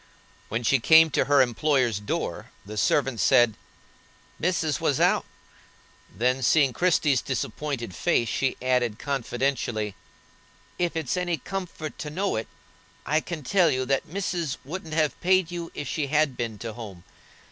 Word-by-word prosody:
When 115 +3 -2
she 135 +3 +3
came 160 +5 +6
to - - +2
her 140 -2 +5
employer's 125 -3 +1
door, 105 - -4 0.2
the 105 +2 -8
servant 130 +3 +1
said: 120 -5 +4 0.8
"Missis 160 -4 0
was - - +1
out;" - - +3 0.9
then 125 +3 0
seeing 135 0 +3
Christie's 155 -4 +2
disappointed 125 -2 -3
face, 105 +6 +1
she 130 +4 -1
added, 125 -4 +1
confidentially: 120 -5 -2 0.9
"If 175 -2 0
it's 160 +1 -1
any 175 -2 0
comfort 165 -2 -6
to 150 - -4
know 190 +6 -1
it, 110 - -3 0.6
I 155 +2 +2
can 160 -3 -6
tell 180 +3 +3
you 130 -2 0
that 135 +1 0
missis 175 -4 -2
wouldn't 160 +1 -6
have 155 -2 0
paid 185 -1 +3
you 170 -1 -5
if 145 - -5
she 145 +1 -2
had 155 +1 +3
a - - -13
been 115 -3 -4
to 115 +2 -6
home. 100 -7 -9
140 Hz, 155 wpm, -26 LUFS, 120-160 Hz, 0.9 s, came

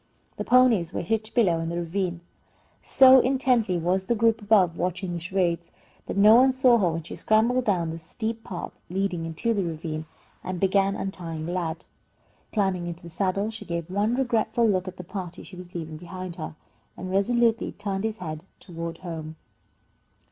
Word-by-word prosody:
The - - -2
ponies 235 -9 +4
were - - -2
hitched 220 +4 -2
below 185 -9 +3
in 165 0 -3
the 170 - -3
ravine. 175 0 -2 0.6
So 265 0 +7
intently 250 -7 +2
was 185 +3 0
the 235 - +2
group 225 0 +2
above 200 -5 +4
watching 180 +1 -2
the 170 - -3
charades, 175 -2 -1 0.4
that - - -4
no 210 +2 +8
one 260 +3 +6
saw 255 -2 +5
her 185 -4 +3
when 165 0 -4
she - - -8
scrambled 235 +4 +2
down 175 -5 +1
the 165 - -6
steep 225 +7 -5
path 180 - -6 0.2
leading 180 -3 -1
into 170 +9 -1
the 200 -3 0
ravine, 160 -2 -4 0.4
and 185 -1 -4
began 195 +1 +2
untying 165 -5 -5
Lad. 170 -1 -3 0.7
Climbing 190 -5 0
into 170 0 -7
the 170 - -9
saddle, 195 +4 -1
she 225 - -8
gave 170 0 -4
one 210 +5 +1
regretful 235 -2 +1
look 190 -3 +1
at 185 0 -7
the 180 - -7
party 180 -1 -7
she 185 - -12
was 180 0 -11
leaving 160 -2 -5
behind 180 +1 -7
her, 155 -2 -6 0.4
and 185 +1 -6
resolutely 230 +4 +2
turned 200 -1 -4
his 220 -1 -2
head 155 -3 -6 0.2
toward 165 -2 -6
home. 160 -2 -6
185 Hz, 180 wpm, -26 LUFS, 170-220 Hz, 0.7 s, no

